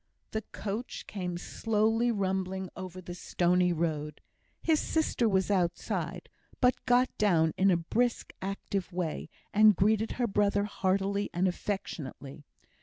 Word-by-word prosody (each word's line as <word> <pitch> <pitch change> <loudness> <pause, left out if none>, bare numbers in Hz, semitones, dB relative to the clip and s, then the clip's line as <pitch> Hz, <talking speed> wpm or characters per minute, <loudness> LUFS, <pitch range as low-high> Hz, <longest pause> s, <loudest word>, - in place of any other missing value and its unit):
The 220 - -1
coach 215 +4 -5
came 180 -3 -4
slowly 225 +5 +1
rumbling 190 -2 -1
over 185 -1 -7
the 175 0 -7
stony 180 0 +2
road. 155 -3 -2 0.4
His 320 -2 +2
sister 280 -7 +1
was 190 0 +1
outside, 180 -3 -1 0.3
but 250 -1 +3
got 250 +1 +3
down 165 -6 +3
in 195 +1 +4
a 180 - +4
brisk 235 +8 -1
active 195 0 -3
way, 175 -3 -3 0.2
and 215 0 +7
greeted 215 +4 +2
her 245 - 0
brother 205 -1 +2
heartily 200 0 0
and 185 +2 +2
affectionately. 155 -7 -5
195 Hz, 130 wpm, -30 LUFS, 180-215 Hz, 0.4 s, and